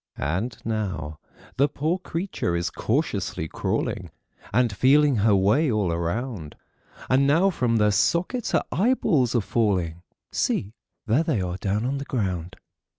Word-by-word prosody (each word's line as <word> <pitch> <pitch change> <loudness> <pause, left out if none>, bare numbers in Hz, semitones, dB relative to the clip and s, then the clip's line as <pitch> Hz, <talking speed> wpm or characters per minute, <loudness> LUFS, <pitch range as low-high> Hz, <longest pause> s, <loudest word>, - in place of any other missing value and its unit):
And 95 +11 -2
now 95 -9 -3 0.4
the 140 +2 +4
poor 155 +5 -1
creature 170 - -3
is 85 0 -1
cautiously 80 - -1
crawling - - -2 0.4
And 120 -1 +2
feeling 140 +4 +4
her 105 0 +4
way 110 +10 +3
all 105 -5 +1
around; 85 - -3 0.5
And 135 +2 +3
now 170 +7 +4
from 125 -8 0
their 105 -1 +3
sockets 175 - +1
her - - +3
eyeballs 180 - +2
are 120 - +3
falling; 95 -7 0 0.3
See, 100 +2 -1 0.3
there 120 +7 +3
they 160 -9 0
are 90 -1 -3
down 105 +4 -1
on 135 +2 -1
the 140 - -5
ground. 95 -8 -2
115 Hz, 145 wpm, -25 LUFS, 95-140 Hz, 0.5 s, the